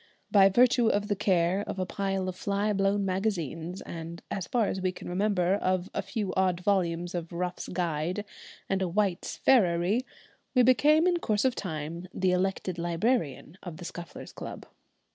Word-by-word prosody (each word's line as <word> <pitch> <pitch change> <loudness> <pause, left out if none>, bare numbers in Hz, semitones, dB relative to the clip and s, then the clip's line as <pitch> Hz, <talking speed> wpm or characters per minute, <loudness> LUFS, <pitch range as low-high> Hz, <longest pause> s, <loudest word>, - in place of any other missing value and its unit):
By 195 -2 +7
virtue 240 +3 +4
of 205 0 +1
the 205 - +2
care 185 -1 +2
of - - -4
a 185 - -1
pile 195 0 -2
of 185 - -3
fly 200 +2 0
blown 195 0 +1
magazines, 185 -3 -2
and 165 0 -7
as 185 -4 -3
far 235 -3 +2
as 190 - -2
we 185 0 +1
can - - -10
remember 185 -1 +1
of 185 -2 0
a - - -1
few 210 -5 -3
odd 185 -2 +1
volumes 175 -3 0
of 170 -2 -4
'Ruff's 180 +1 -3
Guide' 175 +3 -2 0.4
and 195 0 0
a 190 - +1
'White's 190 0 -1
Farriery,' 195 -1 +3 0.5
we 250 - +6
became 300 +6 +5
in 360 -1 +3
course 215 -8 0
of 260 - +3
time 165 -1 -5
the 185 -1 +2
elected 185 -1 -1
librarian 170 - -1
of 175 -4 -8
the 175 - -9
Scufflers' 170 0 -8
Club. - - -8
185 Hz, 175 wpm, -28 LUFS, 175-205 Hz, 0.5 s, By